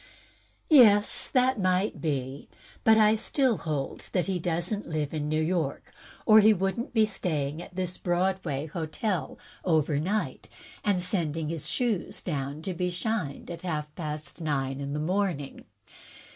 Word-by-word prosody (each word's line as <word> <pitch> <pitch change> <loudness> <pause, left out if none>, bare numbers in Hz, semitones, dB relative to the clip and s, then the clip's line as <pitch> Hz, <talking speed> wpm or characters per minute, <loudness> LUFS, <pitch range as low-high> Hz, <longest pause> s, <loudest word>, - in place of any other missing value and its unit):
"Yes, 210 -8 +6
that 255 -2 +2
might 185 +1 +1
be. 140 -3 -3 0.3
But 220 0 +6
I 215 -1 +6
still 235 +1 +1
hold 145 -4 -4
that 180 - +1
he 190 -2 -1
doesn't 175 +5 -1
live 155 -2 -2
in 150 -1 -2
New 155 +1 +1
York, 160 -4 -2 0.3
or 220 -1 +8
he 215 0 +6
could 195 +4 -1
n't 235 - -4
be 220 -3 +4
sta5mig 155 -7 -2
at 175 - -12
this 180 -1 -2
Broadway 175 -5 -1
hotel 160 +1 -3 0.3
over 155 -4 +2
night, 165 - -2 0.3
and 200 -3 +2
sending 165 -4 -1
his 165 -3 -4
shoes 235 -7 -1
down 145 -2 -3
to 190 - -3
be 180 +1 -1
shined 175 -5 -3
at 170 -1 -7
half 150 -4 -3
past 155 0 -6
nine 135 -3 -1
in 140 0 -4
the 150 - -2
morning. 175 -3 -2
175 Hz, 155 wpm, -28 LUFS, 150-200 Hz, 0.3 s, or